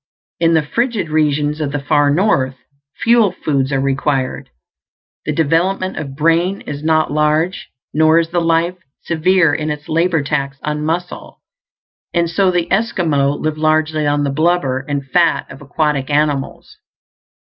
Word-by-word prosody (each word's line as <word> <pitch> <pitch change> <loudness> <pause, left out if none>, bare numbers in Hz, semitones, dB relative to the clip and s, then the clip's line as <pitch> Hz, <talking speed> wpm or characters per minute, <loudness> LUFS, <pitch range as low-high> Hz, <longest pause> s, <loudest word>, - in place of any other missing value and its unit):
In 165 0 +3
the 160 - +3
frigid 225 - -1
regions 150 0 0
of 145 -2 -2
the 145 - -2
far 145 +1 +2
North, 145 -6 +1 0.5
fuel 230 -4 +4
foods 135 -2 -1
are 135 - +1
required. 135 0 -1 0.8
The - - +1
development 170 +5 0
of 140 -3 -6
brain 165 +5 +1
is 145 0 -7
not 155 -1 +2
large, 155 +4 0 0.2
nor 155 +1 +4
is 165 -1 +1
the 175 0 0
life 165 +2 +1 0.3
severe 170 -1 +2
in 155 +1 -2
its 150 0 -5
labor 165 -1 +1
tax 140 -1 -2
on 150 0 -2
muscle; 175 +3 -4 0.7
and 170 0 +2
so 190 +3 +1
the 175 -2 0
Esquimaux 160 -9 +1
live 155 0 -3
largely 155 -1 +1
on 145 0 +1
the 140 - -1
blubber 155 -3 +1
and 140 -1 -2
fat 165 +4 +2
of 135 - -11
aquatic 145 -1 -1
animals. 145 -2 -1
155 Hz, 150 wpm, -17 LUFS, 145-170 Hz, 0.8 s, fuel